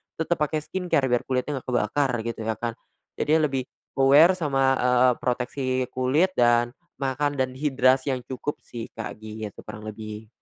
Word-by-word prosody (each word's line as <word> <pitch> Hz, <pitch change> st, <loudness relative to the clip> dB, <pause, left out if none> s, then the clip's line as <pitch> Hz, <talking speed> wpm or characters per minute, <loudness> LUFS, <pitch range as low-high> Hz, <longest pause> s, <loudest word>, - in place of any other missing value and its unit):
tetap 165 Hz, +1 st, -1 dB
pakai 150 Hz, 0 st, 0 dB
skincare 180 Hz, -7 st, 0 dB
biar 120 Hz, -, +1 dB
kulitnya 130 Hz, +2 st, -1 dB
nggak -, -, -22 dB
kebakar, 135 Hz, +2 st, +1 dB
gitu 115 Hz, -1 st, -4 dB
ya 110 Hz, -, 0 dB
kan. 120 Hz, 0 st, -3 dB, 0.5 s
Jadinya 155 Hz, +1 st, +3 dB
lebih, 130 Hz, -1 st, -2 dB, 0.3 s
aware 145 Hz, +6 st, +7 dB
sama, 140 Hz, -4 st, 0 dB, 0.2 s
eee, 125 Hz, 0 st, +4 dB
proteksi 125 Hz, +2 st, -2 dB, 0.3 s
kulit, 140 Hz, +9 st, +2 dB
dan 120 Hz, -4 st, +3 dB, 0.2 s
makan, 145 Hz, +1 st, -1 dB
dan 130 Hz, -1 st, 0 dB
hidrasi 130 Hz, -1 st, +2 dB
yang 125 Hz, -, -7 dB
cukup 130 Hz, +3 st, -4 dB
sih, 115 Hz, -2 st, -7 dB
Kak, 115 Hz, -1 st, -6 dB
gitu 110 Hz, -1 st, -7 dB
kurang 105 Hz, 0 st, -8 dB
lebih. 110 Hz, 0 st, -8 dB
130 Hz, 160 wpm, -25 LUFS, 120-145 Hz, 0.5 s, aware